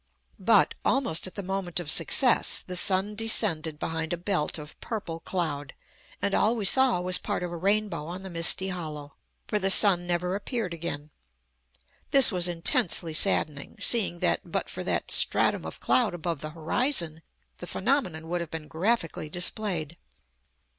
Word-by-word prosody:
But, - - +3
almost 215 -12 0
at 185 - -12
the 200 - -6
moment 185 -2 -3
of 160 -4 -2
success, 255 -4 +4
the 180 - -6
sun 190 +3 +3
descended 205 -8 +2
behind 160 +1 -5
a - - -3
belt 175 -3 -2
of 150 -1 -12
purple 185 -8 -6
cloud, 155 -6 -5 0.5
and 200 - -1
all 220 +3 +1
we 215 -4 -4
saw 260 -1 +4
was 180 0 +2
part - - -4
of 175 - -5
a - - -6
rainbow 195 -3 -2
on 180 +3 -8
the 190 - -8
misty 170 +3 +5
hollow. 155 -5 -8 0.3
For 210 - -2
the 195 -1 +1
sun 190 -3 +5
never 180 +1 -2
appeared 205 -1 -5
again. 155 -3 -7 1.0
This 275 -4 +7
was 180 -2 +1
intensely 165 -1 +2
saddening, 150 -5 -1
seeing 220 -7 +1
that, - - 0
but - - -5
for - - -6
that - - -1
stratum - - +2
of - - -9
cloud 230 -8 0
above 170 -3 -5
the 155 - -6
horizon, 165 - -2 0.4
the 175 - -9
phenomenon 190 - -2
would 175 +1 -3
have 170 - -7
been 160 -1 -8
graphically 165 -2 -3
displayed. 175 -2 -1
175 Hz, 165 wpm, -25 LUFS, 160-200 Hz, 1.0 s, This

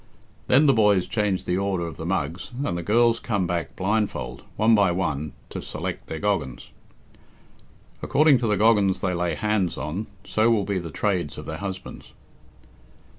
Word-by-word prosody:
Then 140 +4 +5
the 140 - +6
boys 105 -5 +3
change 105 -4 -1
the 90 +1 0
order 95 -3 -1
of 85 - -7
the 80 - -5
mugs, 90 -1 -2 0.2
and 85 - -1
the 85 - -2
girls 115 +5 +3
come 100 -5 -1
back 85 -4 -3
blindfold, 105 +2 -1
one 110 +2 +4
by 100 -4 +4
one, 80 -5 -2 0.2
to - - -5
select - - -5
their 80 - -5
goggans. 85 -10 -2 1.3
According 150 -3 +4
to 115 - -1
the 105 -1 +2
goggans 100 -3 +3
they 95 -1 0
lay 85 -2 -1
hands 105 -3 0
on, 75 +10 -4 0.2
so 110 +2 +2
will 110 -4 +2
be 100 -2 -1
the 85 -2 -6
trades 90 -2 -1
of - - -7
their 80 - -5
husbands. 95 -1 -7
95 Hz, 175 wpm, -24 LUFS, 85-110 Hz, 1.3 s, the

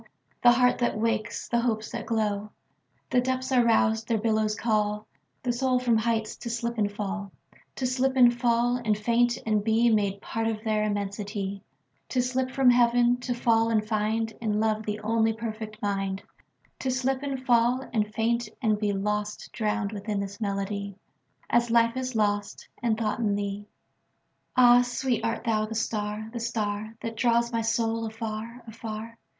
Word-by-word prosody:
The 240 0 +7
heart 250 0 +3
that 240 -3 0
wakes, 225 0 -1
the 235 - +1
hopes 220 -3 -1
that - - -5
glow! 210 -2 -1 0.6
The 250 - +4
depths 260 +1 -2
are 250 -2 +5
roused: 225 -1 +2
their 230 - +1
billows 215 -1 +1
callThe 210 -2 0 0.5
soul 255 +1 +1
from 245 -2 +2
heights 220 -1 -1
to 235 - -6
slip 235 0 -2
and 205 -1 +1
fall; 205 -1 -4 0.4
To 260 - -2
slip 260 +1 +1
and 245 -2 +6
fall 240 0 +2
and 220 -4 0
faint 235 +2 +2
and 215 -2 +1
beMade 220 -3 +2
part 225 +2 -3
of 220 -1 -3
their 215 -2 +1
immensity; 200 -1 -3 0.5
To 255 - 0
slip 255 +1 0
from 260 -1 +4
Heaven; 240 0 +4
to 245 0 -3
fall 230 -1 +2
and 220 -2 +2
findIn 215 0 -1
love 215 0 0
the 210 0 -2
only 225 +1 +2
perfect 220 -1 -6
mind; 195 -1 -1 0.6
To 265 - -2
slip 260 +1 0
and 270 -2 -4
fall 245 +1 +3
and 210 -2 0
faint 230 +1 0
and 215 -4 +1
beLost, 210 0 -2
drowned 215 -2 -1
within 205 0 -3
this 200 +2 -5
melody, 200 -1 -3 0.5
As 240 0 +2
life 230 0 +3
is 255 -1 -3
lost 205 -1 -1
and 230 -2 +1
thought 215 -1 -1
in 210 -3 +1
thee. 205 0 -4 0.9
Ah, 245 -1 +8
sweet, 245 -1 -1
art 230 0 -1
thou 215 -2 +1
the 225 - -6
star, 215 -1 -2
the 235 - -3
starThat 220 0 -3
draws 235 0 +2
my 230 - +1
soul 225 0 0
afar, 225 +2 -6
afar? 225 0 -7
225 Hz, 165 wpm, -27 LUFS, 210-240 Hz, 0.9 s, Ah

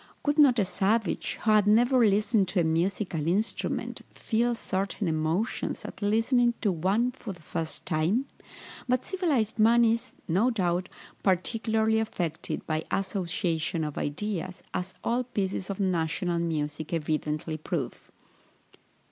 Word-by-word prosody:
Would 290 +1 +2
not 270 -5 +7
a 205 - +3
savage, 205 +4 0
who 220 - +3
had 210 -1 +5
never 240 +5 +5
listened 210 -1 +3
to 180 0 +1
a - - +2
musical 165 0 0
instrument, 200 +6 -1
feel 235 +1 0
certain 195 -1 -2
emotions 160 +7 -1
at - - -8
listening 235 +3 +3
to 205 - +2
one 195 +9 +1
for 240 -5 -7
the 175 - -16
first 160 +1 -4
time? 175 - +1 0.6
But 255 0 +1
civilized 290 - 0
man 235 +2 +6
is, 230 +3 0
no 195 +9 +3
doubt, 185 -5 0 0.3
particularly 220 +3 +1
affected 175 -7 -3
by 155 0 -1
association 175 -3 -1
of 150 -2 -4
ideas, 185 +3 -3
as 185 +1 -3
all 240 +2 +1
pieces 195 -5 -2
of 195 - -4
national 175 -2 0
music 155 -2 -2
evidently 155 0 -1
prove. 155 -3 -4
195 Hz, 135 wpm, -28 LUFS, 170-225 Hz, 0.6 s, not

